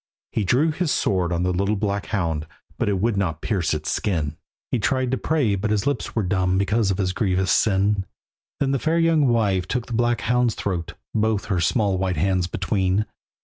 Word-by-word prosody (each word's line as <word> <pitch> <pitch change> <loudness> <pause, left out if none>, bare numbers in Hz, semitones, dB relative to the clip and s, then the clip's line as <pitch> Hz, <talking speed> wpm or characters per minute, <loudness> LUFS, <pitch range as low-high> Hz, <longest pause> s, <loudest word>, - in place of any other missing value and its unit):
He 110 - 0
drew 135 - +2
his 170 +1 -1
sword 90 -3 +1
on 85 0 0
the 90 0 +1
little 100 +4 +1
black 100 0 -2
hound, 80 -7 -1 0.3
But - - +1
it 100 - +1
would 115 +2 +1
not 80 -6 -1
pierce 95 -8 0
its 75 0 -3
skin, 80 -7 -1 0.4
He 125 - +1
tried 130 +3 0
to 130 - +1
pray, 145 -9 +1
but 100 +2 -1
his 105 -1 0
lips 140 0 -2
were 110 - +1
dumb 95 0 +1
Because 100 +2 +1
of 95 - 0
his 95 -2 0
grievous 95 -1 +1
sin. 100 -1 +2 0.5
Then 135 -1 +1
the 135 - +1
fair 160 +5 +1
young 165 -4 +3
wife 100 -7 +1
took 125 +2 -2
the 120 - -7
black 120 0 +1
hound's 125 -2 +1
throat 90 -5 -3 0.2
Both 110 -1 +1
her 90 - +1
small 100 +1 +1
white 95 -2 -1
hands 90 +2 +1
between. 95 +2 0
100 Hz, 205 wpm, -23 LUFS, 95-120 Hz, 0.5 s, young